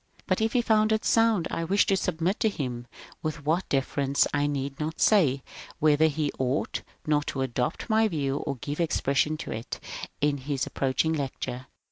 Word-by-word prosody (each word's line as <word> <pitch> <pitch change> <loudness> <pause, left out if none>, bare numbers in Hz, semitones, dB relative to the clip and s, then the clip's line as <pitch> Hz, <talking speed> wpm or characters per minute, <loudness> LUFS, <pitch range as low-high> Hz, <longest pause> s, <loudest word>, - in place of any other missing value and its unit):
But - - 0
if 220 0 +1
he 245 -2 +3
found 215 -1 +3
it 220 0 +1
sound 225 -6 +3
I 165 - -2
wished 195 +5 +2
to 195 - +4
submit 180 +1 -1
to 220 - +3
him, 125 - -4 0.3
with 155 -2 -4
what 165 +5 0
deference 140 0 +1
I 145 0 +2
need 140 -1 -3
not 155 +1 -3
say, 145 -11 +4 0.3
whether 155 +1 +4
he 150 -1 -1
ought 130 +2 -1 0.2
not 150 -1 +1
to 135 - -2
adopt 125 +3 -2
my 220 0 +4
view 145 -6 -1
and 140 -3 -2
give 145 +2 -4
expression 155 -2 +1
to 165 - -6
it 115 +2 -5 0.4
in 145 0 +2
his 135 0 -2
ap - - -10
proaching 140 +4 +1
lecture. 130 -3 -4
150 Hz, 185 wpm, -27 LUFS, 135-175 Hz, 0.4 s, to